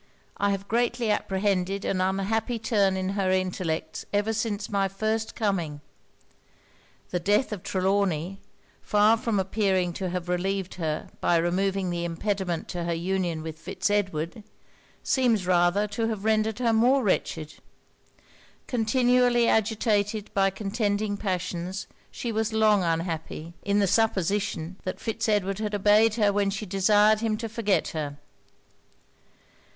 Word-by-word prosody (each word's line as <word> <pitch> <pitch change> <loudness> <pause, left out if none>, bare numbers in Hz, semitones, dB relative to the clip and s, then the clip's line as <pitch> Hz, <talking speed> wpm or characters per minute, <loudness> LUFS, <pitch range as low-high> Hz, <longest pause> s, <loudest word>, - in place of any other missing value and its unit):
I 200 - +1
have 195 0 -2
greatly 240 0 +1
apprehended 195 -1 0
an 185 - 0
unhappy 205 +5 0
turn 205 -4 +1
in 190 0 -2
her 195 -1 0
intellects 185 -3 -1
ever 205 +2 +1
since 215 -1 -2
my 200 -1 +1
first 215 +3 -2
coming. 175 -9 -1 1.3
The 180 - 0
death 205 +6 +1
of 205 -4 -4
Trelawny, 190 -2 0 0.4
far 210 +2 +4
from 225 -2 -1
appearing 190 -2 +1
to 185 +1 -3
have 180 0 -4
relieved 185 +1 -1
her 155 -1 -2
by 175 - +3
removing 185 +2 0
the 170 0 -2
impediment 175 0 -2
to 175 -1 -3
her 170 0 -1
union 175 -2 -1
with 160 -1 -7
Fitz 205 - -2
Edward, 190 -1 -1 0.6
seems 235 -7 +2
rather 180 +3 +3
to 225 +2 -1
have 215 -2 -4
rendered 220 0 +1
her 240 -2 +1
more 250 +4 +4
wretched. 160 -6 -1 1.1
Continually 245 0 +3
agitated 215 -1 +1
by 195 -1 +3
contending 205 +1 -1
passions, 185 -1 -3 0.2
she 235 - -4
was 220 0 -1
long 215 -2 +4
unhappy, 165 -1 -3
in 200 0 0
the 205 - +4
supposition 195 -4 0
that 185 - -4
Fitz 225 0 -2
Edward 195 -2 +1
had 210 -1 -2
obeyed 210 +2 +4
her 210 -3 +2
when 200 -1 +1
she 195 +2 -4
desired 210 +3 +4
him 220 -1 0
to 230 +1 -4
forget 215 -3 0
her. 145 -3 -4
200 Hz, 140 wpm, -26 LUFS, 185-215 Hz, 1.3 s, far